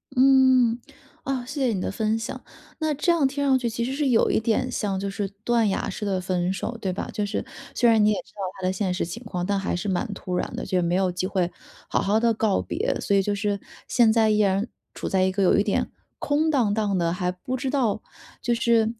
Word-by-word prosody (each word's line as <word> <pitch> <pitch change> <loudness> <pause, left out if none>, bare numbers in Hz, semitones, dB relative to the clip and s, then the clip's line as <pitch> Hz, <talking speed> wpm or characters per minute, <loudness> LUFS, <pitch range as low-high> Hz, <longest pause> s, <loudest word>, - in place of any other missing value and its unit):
嗯， 260 -2 +5 0.4
啊， 260 -3 -2
谢 285 +1 -5
谢 230 - +1
你 185 - -2
的 - - -2
分 220 +2 0
享。 240 +3 -5 0.4
那 310 -1 0
这 300 +5 +1
样 310 -5 +3
听 285 +1 -3
上 265 -2 +3
去 240 - -1
其 235 +1 -3
实 260 +3 -2
是 285 0 0
有 235 -3 +3
一 - - +2
点 235 +3 0
像 195 -5 -1
就 200 0 -3
是 200 0 -3 0.2
断 235 -3 +2
崖 195 - -1
式 205 +2 -5
的 190 -2 0
分 180 0 0
手， 230 +4 -4
对 190 -4 -2
吧？ - - -4
就 210 - -1
是 200 - -3 0.3
虽 240 -2 +4
然 220 -2 +5
你 210 - +5
也 - - +1
知 - - -22
道 205 - -7 0.2
他 185 - 0
的 - - +2
现 190 -2 -1
实 180 - -1
情 230 +8 -7
况， 180 -4 -3
但 200 0 0
还 190 - -2
是 175 +3 -3
蛮 190 +6 0
突 185 -2 -5
然 180 - -2
的， - - -4
就 185 - 0
是 - - +3
没 170 +1 +1
有 190 -1 +2
机 185 +1 -2
会 180 -3 0 0.4
好 - - +1
好 205 +3 +2
地 230 0 +3
告 215 -2 +1
别。 - - -2
所 200 - +1
以 195 - +5
就 205 +1 -1
是， 200 0 -1 0.3
现 235 -3 +4
在 220 -1 +3
依 215 0 +2
然 200 +2 +2 0.3
处 - - -4
在 190 -1 +2
一 190 - +2
个 195 +1 0
有 185 - +4
一 200 - +3
点 205 - -1 0.3
空 305 +2 +1
荡 240 -9 +2
荡 205 -3 0
的， 170 -1 +1
还 180 0 -1
不 250 +8 -5
知 260 +1 -2
道 245 -7 0 0.4
就 240 -1 +1
是 230 -1 +2
215 Hz, 280 characters per minute, -25 LUFS, 190-245 Hz, 0.4 s, 嗯